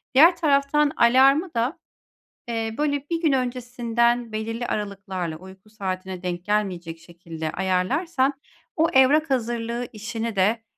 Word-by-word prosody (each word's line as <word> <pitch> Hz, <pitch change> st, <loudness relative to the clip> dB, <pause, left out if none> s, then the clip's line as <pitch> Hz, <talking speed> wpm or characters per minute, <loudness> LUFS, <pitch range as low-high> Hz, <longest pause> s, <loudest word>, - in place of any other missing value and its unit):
Diğer 330 Hz, +6 st, +7 dB
taraftan 290 Hz, -1 st, +2 dB
alarmı 270 Hz, +8 st, +4 dB
da, 240 Hz, +7 st, -1 dB, 0.7 s
eee, 225 Hz, -1 st, -3 dB
böyle 285 Hz, -1 st, -1 dB
bir 335 Hz, -1 st, -1 dB
gün 315 Hz, -4 st, +3 dB
öncesinden 240 Hz, -2 st, 0 dB
belirli 225 Hz, +2 st, -3 dB
aralıklarla, 195 Hz, -5 st, -4 dB
uyku 190 Hz, +3 st, -15 dB
saatine 190 Hz, -3 st, -5 dB
denk 175 Hz, 0 st, -4 dB
gelmeyecek 180 Hz, -6 st, -2 dB
şekilde 165 Hz, -2 st, -7 dB
ayarlarsan 260 Hz, -, 0 dB, 0.4 s
o 325 Hz, +1 st, +3 dB
evrak 280 Hz, +4 st, +5 dB
hazırlığı 235 Hz, -1 st, -2 dB
işini 225 Hz, +1 st, -4 dB
de, 210 Hz, +4 st, +1 dB
230 Hz, 120 wpm, -24 LUFS, 190-270 Hz, 0.7 s, Diğer